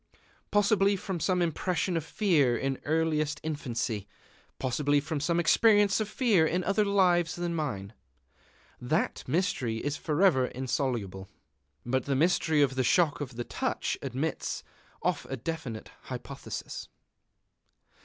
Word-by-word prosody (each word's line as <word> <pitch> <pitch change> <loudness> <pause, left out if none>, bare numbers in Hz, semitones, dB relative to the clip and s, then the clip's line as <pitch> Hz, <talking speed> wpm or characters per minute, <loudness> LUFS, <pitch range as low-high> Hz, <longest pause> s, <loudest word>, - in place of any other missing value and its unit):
Possibly 205 -1 +3
from 190 -2 -4
some 180 +1 +1
impression 175 +2 -1
of 165 - 0
fear 160 - +2
in 135 -1 -2
earliest 155 -1 +1
infancy; 120 -9 -3 0.5
possibly 145 +3 +1
from 155 +1 -3
some 170 +4 +1
experience 205 +4 +4
of 215 -1 -2
fear 215 -9 +3
in 180 +3 0
other 200 +3 +2
lives 180 -4 +3
than 175 -1 -2
mine. 105 -11 -3 0.9
That - - 0
mystery 130 - 0
is 145 +4 -2
forever 155 -5 +3
insoluble. 120 -8 -3 0.6
But 130 +1 0
the 140 - 0
mystery 160 0 +3
of 135 -2 +1
the 130 0 0
shock 150 +3 +3
of 135 -4 -5
the 120 - -3
touch - - -2
admits 135 +4 -3 0.4
of - - -1
a 135 - -3
definite 130 -5 -5
hypothesis. - - -6
155 Hz, 130 wpm, -29 LUFS, 130-180 Hz, 0.9 s, experience